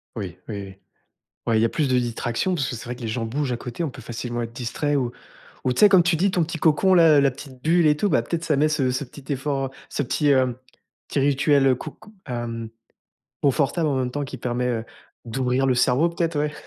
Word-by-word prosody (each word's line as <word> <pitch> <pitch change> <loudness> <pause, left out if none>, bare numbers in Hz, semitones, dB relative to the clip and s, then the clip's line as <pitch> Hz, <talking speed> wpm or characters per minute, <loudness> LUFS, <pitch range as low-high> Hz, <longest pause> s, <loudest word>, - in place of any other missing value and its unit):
Oui, 95 -6 -5
oui 105 -3 -4
oui, 95 -1 -10 0.7
ouais 115 -1 +3
il - - +2
y - - +4
a - - -1
plus 150 +5 0
de 130 -1 +3
distractions 120 +8 -1
parce 140 -6 -1
que - - -4
c'est 115 - -8
vrai 125 +1 -5
que 125 - -11
les 115 - -3
gens 115 +1 -2
bougent 135 +3 -2
à 120 - 0
côté. 125 +7 -5
On 155 - -2
peut 130 - -11
facilement 120 +1 -4
être 115 - -6
distrait 140 +5 -2
ou 125 -3 0 0.5
ou, 130 - +1
tu - - -1
sais, 210 - +9
comme 190 -2 +7
tu 175 0 +2
dis, 185 +4 +2
ton 175 - +2
petit 165 +1 -4
cocon, 165 +5 +3
là, 160 -4 +6
la 140 - +4
petite 130 -1 -11
bulle 170 +2 +3
et 150 - +5
tout, 205 +7 0
bah 130 -8 +2
peut-être 165 +7 -3
ça 160 -3 +1
met 150 +2 +3
ce 150 -4 +1
ce 130 +3 -2
petit 140 +2 -10
effort, 135 0 -1
heu, - - -10 0.2
ce - - -2
petit 145 +3 +1
heu, 130 -2 +2 0.5
petit - - -1
rituel 140 -1 +3
coco 215 - -10
hem, 115 -3 -4 0.7
confortable, 145 +4 +2
en 140 - 0
même 130 -1 -1
temps, 145 +3 -3
qui 135 - -8
permet, 125 0 -1
heu, 115 -2 -2 0.4
d'ouvrir 125 +2 0
le 130 - +3
cerveau, 125 +6 +3
peut-être, 170 -2 -1
ouais. 150 0 0
135 Hz, 250 wpm, -23 LUFS, 120-150 Hz, 0.7 s, sais